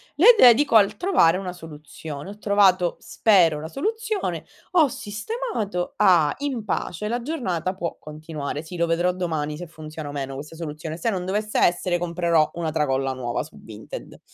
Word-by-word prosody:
"le 450 - +8
dedico 250 - +6
al 205 0 +3
trovare 185 - +3
una 185 -2 -5
soluzione". 155 -1 -9
Ho 205 - -11
trovato, 195 -4 +3
spero, 175 -8 +3
la 160 - -6
soluzione, 435 - -3 0.3
ho 330 -5 +5
sistemato, 215 - -4
ah! 170 -7 +4
In 265 -7 -3
pace, 205 +1 -3
la 240 +2 -2
giornata 185 - -2
può 170 -3 -4
continuare. 150 -1 -6
Sì, 175 +2 -8
lo 170 0 +1
vedrò 175 +2 +2
domani 155 -4 -3
se 175 0 -7
funziona 155 -1 -8
o - - -5
meno 135 -1 -4
questa 150 +4 -8
soluzione. 155 0 -6
Se 230 - -1
non 185 -3 -3
dovesse 210 +3 -1
essere, 175 0 +2
comprerò 170 -2 +1
una 165 -2 -2
tracolla 135 -3 0
nuova 120 -2 -3
su 155 - -14
Vinted. 110 -1 -10
175 Hz, 165 wpm, -23 LUFS, 155-210 Hz, 0.3 s, le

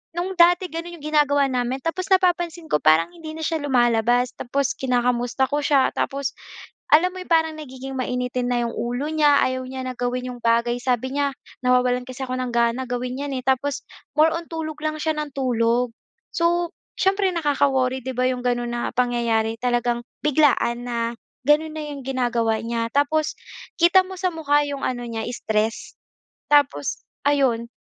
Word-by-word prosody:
no’ng 355 +2 -2
dati 355 +1 +5
gano’n 335 +2 -6
‘yong 300 - -15
ginagawa 285 -2 +3
namin, 250 0 0
tapos 365 +3 -2
napapansin 350 -3 +1
ko 150 - +3
parang 155 - +4
hindi 325 -3 -9
na 320 - -6
siya 325 0 0
lumalabas. 245 -2 +2
Tapos 275 +2 -1
kinakamusta 245 0 0
ko 290 +2 -1
siya, 280 -2 +3
tapos 275 -1 -1 0.6
alam 350 +4 +6
mo 370 - -8
'yong 365 - -8
parang 320 -1 +4
nagiging 265 -2 -8
mainitin 250 0 -2
na 245 -1 +1
‘yong 235 - -2
ulo 245 +6 -3
niya. 295 -2 +4
Ayaw 255 0 -1
niya 260 0 -5
na 255 - -3
gawin 250 +1 -2
‘yong 245 - -9
bagay, 235 +1 +1
sabi 250 0 -1
niya 280 -1 0 0.3
nawawalan 250 0 +2
kasi 260 +1 -6
ako 255 - -5
ng 255 - -2
gana 235 +2 +1
gawin 250 +1 -3
‘yan, 285 -1 -3
eh, 255 - -4
tapos 270 +2 0 0.3
more 315 +1 +5
on 335 0 -4
tulog 315 -2 -5
lang 310 0 -2
siya 315 - +1
ng 295 -2 -5
tulog. 245 -2 +1 0.4
So, 345 0 +1 0.2
siyempre, 390 +1 +2
nakaka-worry, 270 -4 +1
‘di 260 -2 -4
ba, 250 - 0
‘yong 255 -1 -2
gano’n 240 -1 0
na 240 0 -2
pangyayari, 230 -2 +1
talagang 240 -1 0 0.2
biglaan 255 -5 +2
na 235 -1 -1 0.3
gano’n 305 +3 +2
na 310 - -4
‘yong 275 -2 -8
ginagawa 235 -4 0
niya. 230 0 -1
Tapos, 295 +2 +1 0.4
kita 345 +2 +5
mo 375 - -7
sa 370 0 -1
mukha 295 -3 +2
‘yong 285 -1 -4
ano 245 -1 -2
niya, 225 -1 -4
stress. 220 -2 -2 0.6
Tapos, 285 - +2 0.2
ayon, 250 -5 +1
260 Hz, 175 wpm, -23 LUFS, 245-310 Hz, 0.6 s, alam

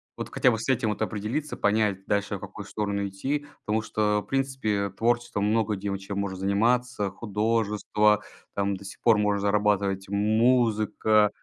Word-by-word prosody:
Вот - - -6
хотя 130 - +3
бы 115 - 0
с 115 - -5
этим, 125 -4 +2
вот, 105 - -3
определиться, 110 +9 -3
понять 105 -2 +1
дальше, 100 0 0
в - - -14
какую 105 - -8
сторону 100 -1 -2
идти. 135 +10 -3 0.2
Потому 110 +1 +1
что 105 -1 +1
в - - -28
принципе 130 -7 0
творчеством 120 +1 0
много 110 0 +1
где 100 +1 -4
в 100 - -2
чем 100 +1 -6
можно 100 -1 -2
заниматься: 105 +2 +1
художество, 105 0 +1 0.3
там, 100 0 0
до 100 - -13
сих 100 - -9
пор 115 -3 +5
можно 105 -1 +1
зарабатывать, 100 -1 +1
музыка 110 0 +3
105 Hz, 170 wpm, -26 LUFS, 100-115 Hz, 0.3 s, пор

